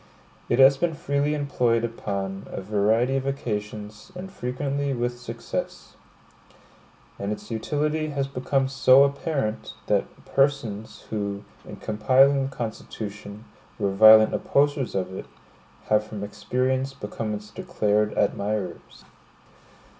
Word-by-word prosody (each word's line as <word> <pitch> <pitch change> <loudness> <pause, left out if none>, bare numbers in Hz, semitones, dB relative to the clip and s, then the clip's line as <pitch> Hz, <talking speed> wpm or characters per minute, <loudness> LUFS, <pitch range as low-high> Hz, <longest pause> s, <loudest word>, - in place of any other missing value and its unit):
It 120 - +2
has 135 +1 +7
been 165 +1 0
freely 140 +1 0
employed 125 -5 +1
upon 100 -4 -4
a - - -6
variety 110 +6 +1
of 135 0 -3
occasions, 105 - -5
and 185 +1 -7
frequently 140 -1 -2
with 120 0 -2
success. 115 -1 -6 1.2
And 100 +1 -2
its 105 - -6
utility 150 +7 -1
has 140 -2 -1
become 135 0 0
so 135 0 +6
apparent, 140 -5 -2
that - - +2 0.2
persons 135 -7 0
who, 100 -1 -3 0.2
in - - -8
compiling 135 +5 +3
the 135 - -14
Constitution, 105 -2 -6 0.3
were 100 - 0
violent 110 +2 +8
opposers 140 -4 +1
of 95 -1 -2
it, - - -7 0.6
have 105 0 +4
from 105 -1 -7
experience 130 +5 -1
become 105 -2 -4
its 105 0 -9
declared 105 0 0
admirers. 100 -3 -2
120 Hz, 120 wpm, -25 LUFS, 105-135 Hz, 1.2 s, violent